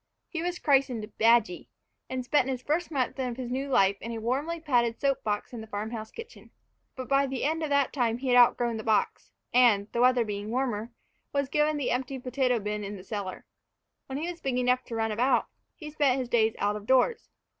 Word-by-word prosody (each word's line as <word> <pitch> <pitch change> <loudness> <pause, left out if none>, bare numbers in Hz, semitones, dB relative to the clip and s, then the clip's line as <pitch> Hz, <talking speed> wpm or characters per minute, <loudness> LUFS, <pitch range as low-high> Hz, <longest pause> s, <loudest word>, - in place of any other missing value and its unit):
He 335 - -4
was 355 +1 -2
christened 260 -9 +1
"Badgy," 225 -5 +3 0.4
and 255 -1 -3
spent 265 0 +2
the 265 -1 -1
first 305 +7 -2
month 270 -3 -2
of 250 -2 -2
his 250 -2 -5
new 270 +2 -2
life 195 -6 +3
in 230 - -5
a 230 - -4
warmly 275 +9 -2
padded 240 -7 +1
soap 275 -1 0
box 210 +3 -2
in 235 - -6
the 220 - -10
farm 215 +1 -4
house 220 -2 -6
kitchen. 460 +1 -11 0.5
But 255 -1 -6
by 275 0 +3
the 260 -2 -4
end 320 +3 0
of 310 - -2
that 280 -2 +2
time 235 -4 0
he 260 +1 -4
had 245 - +4
outgrown 240 -1 +4
the 220 - -6
box, 220 -1 0 0.2
and, 225 -5 +4
the 235 - 0
weather 250 -1 +4
being 205 0 -5
warmer, 240 -2 -2 0.4
was 280 -2 0
given 300 +1 +1
the 275 -4 -1
empty 260 +2 -2
potato 255 -1 0
bin 210 -1 -3
in 200 +1 -5
the 185 - -11
cellar. 195 -2 -5 0.6
When 265 - -4
he 315 +4 -3
was 345 - -12
big 265 -2 -1
enough 250 0 +2
to 230 - -6
run 225 0 0
about, 245 +3 +2 0.3
he 305 -2 -9
spent 285 -4 +2
his 255 -2 -3
days 225 -2 +2
out 205 +1 0
of 210 0 -8
doors. 260 - +2
250 Hz, 220 wpm, -28 LUFS, 225-275 Hz, 0.6 s, had